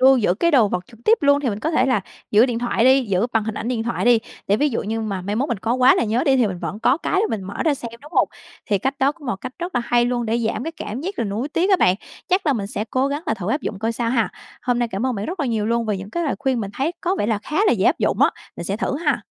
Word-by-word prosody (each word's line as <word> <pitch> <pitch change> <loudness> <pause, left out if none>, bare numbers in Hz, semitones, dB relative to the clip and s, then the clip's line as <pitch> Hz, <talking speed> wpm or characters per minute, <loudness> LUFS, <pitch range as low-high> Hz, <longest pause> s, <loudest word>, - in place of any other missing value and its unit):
lưu 265 +1 +7
giữ 210 -7 +2
cái 340 - +2
đồ 250 -9 +5
vật 180 -2 -2
trực 230 -2 -18
tiếp 450 - +5
luôn 285 0 +4
thì 275 - -1
mình 205 0 -4
có 315 - -1
thể 270 -5 +2
là 255 -6 +2 0.3
giữ 215 +4 +6
điện 240 -3 -2
thoại 235 -1 +1
đi 260 +1 +5
giữ 200 0 +1
bằng 225 -1 +1
hình 220 0 -3
ảnh 230 - -4
điện 240 -3 -1
thoại 235 +1 -2
đi, 240 -1 +6 0.3
để 200 - +3
ví 295 +6 +2
dụ 240 - -2
như 225 +2 -2
mà 200 -4 -3
mai 205 +3 -2
mốt 275 +4 0
mình 235 - -1
có 230 +5 0
quá 255 0 +6
là - - +1
nhớ 230 +3 0
đi 270 -1 +4
thì 245 - +3
mình 185 -3 -4
vẫn 205 - -5
có 255 - +4
cái 335 - -3
để 440 - +2
mình 215 -3 -2
mở 195 +2 -7
ra 310 -3 +3
xem, 235 -3 -7
đúng 300 +4 -13
hông? - - +3 0.4
Thì 205 -3 +1
cách 270 +7 -2
đó 275 +2 +3
cũng 295 -3 -14
một 240 -6 -1
cách 255 +6 -7
rất 350 +1 -5
là - - +2
hay 240 0 +3
luôn 240 -1 -1
để 225 +2 +1
giảm 225 - -2
cái 325 - -4
cảm 220 -1 -5
giác 375 +5 -5
là 230 - +1
nuối 215 +8 -2
tiếc 350 +6 +1
á 380 - +6
bạn, 180 - +4 0.3
chắc 370 -1 +1
là 290 - +4
mình 210 -6 -2
sẽ 210 +1 -3
cố 260 +2 +1
gắng 290 +2 -3
là - - +1
thử 205 -3 -5
áp 290 - 0
dụng 205 - -4
coi 225 +3 -1
sao 230 0 -1
ha. 230 -3 +2 0.3
Hôm 245 -1 +1
nay 240 -1 0
cảm 215 +4 -2
ơn 255 - 0
bạn 200 -1 -4
rất 360 +1 -4
là 285 - 0
nhiều 220 -3 0
luôn 235 0 0
về 210 - 0
những 195 +2 -8
cái 340 +7 -2
lời 285 - 0
khuyên 265 -4 0
mình 200 -2 -4
thấy 290 +6 -1
có 360 +2 0
vẻ - - 0
là 220 -2 +1
khá 300 - -4
là - - +5
dễ - - +1
áp - - +3
dụng - - +1
á, - - +5 0.3
mình 170 - -5
sẽ 195 +3 -2
thử 265 - -1
ha! 290 -4 +2
240 Hz, 345 wpm, -21 LUFS, 215-275 Hz, 0.4 s, lưu